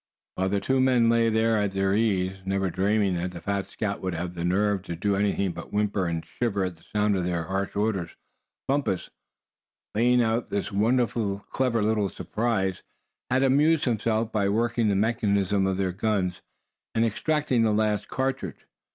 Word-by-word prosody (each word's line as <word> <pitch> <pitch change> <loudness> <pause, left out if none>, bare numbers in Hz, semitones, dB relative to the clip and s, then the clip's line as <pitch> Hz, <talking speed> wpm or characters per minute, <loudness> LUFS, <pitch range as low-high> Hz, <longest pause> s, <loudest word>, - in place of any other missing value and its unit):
While 95 +1 -1
the 100 +1 +1
two 130 +6 +1
men 125 -3 +4
lay 115 0 +3
there 110 0 +2
at 100 -2 0
their 95 0 +1
ease, 95 -3 +1
never 95 -1 -1
dreaming 100 +1 +1
that 90 +1 -3
the 85 - -7
fat 100 +1 -2
scout 105 -2 -3
would 95 -2 -2
have 85 +1 -4
the 85 -1 -5
nerve 100 +2 +1
to 85 - -4
do 100 +4 0
anything 100 -1 +1
but - - -9
whimper, 105 -3 0
and 85 -1 -3
shiver 105 -5 -1
at 90 -2 -3
the - - -22
sound 105 -1 0
of 95 - 0
their 85 -2 -1
harsh 95 +4 -3
orders, 100 -5 0 0.6
Bumpus, 135 -9 -1 0.8
laying 120 +3 +3
out 115 +1 0
this 100 +1 -2
wonderfully 110 -1 +1
clever 125 -4 +1
little 105 -2 +1
surprise, 105 -5 -1 0.5
had 130 +1 +2
amused 145 +4 +3
himself 115 -2 0
by 100 -3 +1
working 115 +2 +1
the 100 - +2
mechanism 100 -2 +1
of 95 -1 0
their 95 -1 0
guns, 95 -2 -1 0.5
and 115 0 +3
extracting 145 +2 0
the 110 -1 +3
last 105 -1 +1
cartridge. 130 - -3
105 Hz, 175 wpm, -26 LUFS, 95-115 Hz, 0.8 s, men